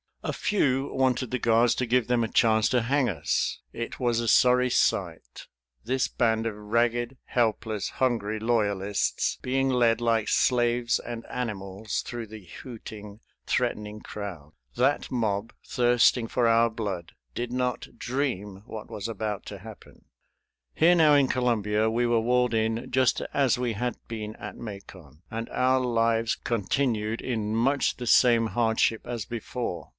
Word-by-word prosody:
A - - -2
few 140 -10 0
wanted 130 -2 +1
the 125 - -1
guards 115 +1 +3
to 125 - -1
give 125 -1 +2
them 120 -1 +2
a - - 0
chance 110 -1 +3
to 125 -3 +2
hang 135 +1 +1
us. 80 -7 -1
It 115 - -5
was 120 -2 +1
a 120 - -2
sorry 125 +2 +4
sight - - -1 0.4
this 130 +3 0
band 115 -1 0
of 115 -2 -2
ragged, 120 +4 0
helpless, 110 -3 -1
hungry 110 -4 -1
loyalists 105 -3 0
being 135 +1 0
led 120 -3 +3
like 115 -2 +1
slaves 120 -1 +2
and 115 -1 -7
animals 105 -3 -4
through 120 -2 -6
the 105 -2 -11
hooting, 105 - -10 0.3
threatening 105 0 -1
crowd. 90 -9 -8 0.2
That 135 +3 +1
mob, 110 -4 -1
thirsting 120 -1 +3
for 120 +1 +1
our 115 +1 +4
blood, 100 -7 -5 0.2
did 120 0 -3
not 125 0 -2
dream 105 -7 -3
what 110 -1 -8
was 105 +1 -4
about 110 -3 -4
to 100 - -7
happen. 110 +2 -13 0.7
Here 170 +3 +5
now 155 -3 +5
in 140 -2 +4
Columbia 110 -4 +1
we 120 +2 +1
were 120 -1 +2
walled 125 +1 +2
in 110 +1 -1
just 130 -2 +2
as 135 -4 +2
we 125 -2 -1
had 120 +2 -3
been 110 -1 -6
at - - -8
Macon, 95 - -10
and 115 0 -4
our 130 +1 +2
lives 115 -2 +1
continued 115 0 -1
in 110 -4 -2
much 135 +5 +1
the 125 - -6
same 115 -1 +5
hardship 110 0 +1
as 120 -3 -4
before. 115 - -5
115 Hz, 150 wpm, -27 LUFS, 110-125 Hz, 0.7 s, Here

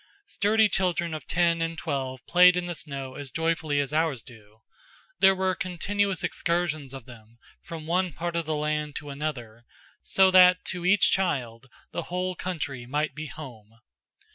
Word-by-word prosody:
Sturdy 220 - +3
children 175 -4 0
of 155 - -7
ten 170 -1 +2
and 165 0 -2
twelve 130 -5 -4
played 180 0 +6
in 180 - -1
the 175 - -3
snow 140 -5 -6
as 140 0 -7
joyfully 160 -1 0
as 140 0 -2
ours 155 -7 0
do; 110 -2 -17 0.6
there 195 0 +6
were 190 0 0
continuous 195 +2 -1
excursions 170 -5 -1
of 135 -4 -9
them, 115 -2 -15 0.2
from 160 -2 -8
one 180 +2 0
part 170 +4 -4
of 170 -2 -1
the 155 - 0
land 150 0 -2
to 145 -2 -6
another, 125 -6 -5 0.4
so 190 -1 +4
that 180 0 +6
to 180 -1 -3
each 200 0 +5
child 130 -10 -1 0.2
the - - -3
whole 180 +1 -2
country 145 -9 -4
might 150 +4 -1
be 155 0 -6
home. 115 -8 -11
160 Hz, 165 wpm, -26 LUFS, 135-180 Hz, 0.6 s, played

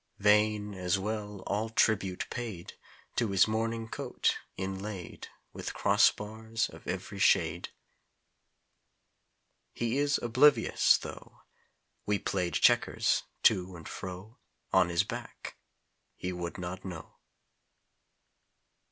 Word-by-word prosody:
Vain, 105 0 +3
as 90 -1 0
well, 105 -1 -4
all 105 +3 -1
tribute 100 -4 +1
paid 110 -8 -5 0.4
To 115 - +2
his 95 +1 +4
morning 115 +1 -1
coat, - - -1 0.2
inlaid 95 -1 -5 0.3
With - - -6
crossbars 110 +1 +2
of - - -14
every - - -4
shade. - - +3 2.1
He 120 +3 0
is 145 0 +2
oblivious, 130 +5 +4
tho - - -10 0.6
We 105 0 +2
played 90 -3 -2
checkers - - +3 0.2
to 90 0 +3
and 85 - -10
fro 95 +5 -8 0.3
On 90 - +5
his 85 -1 +2
back - - -7 0.6
he 90 0 -4
would 85 0 -5
not 90 0 -6
know. 90 -4 -8
105 Hz, 105 wpm, -30 LUFS, 90-110 Hz, 2.1 s, On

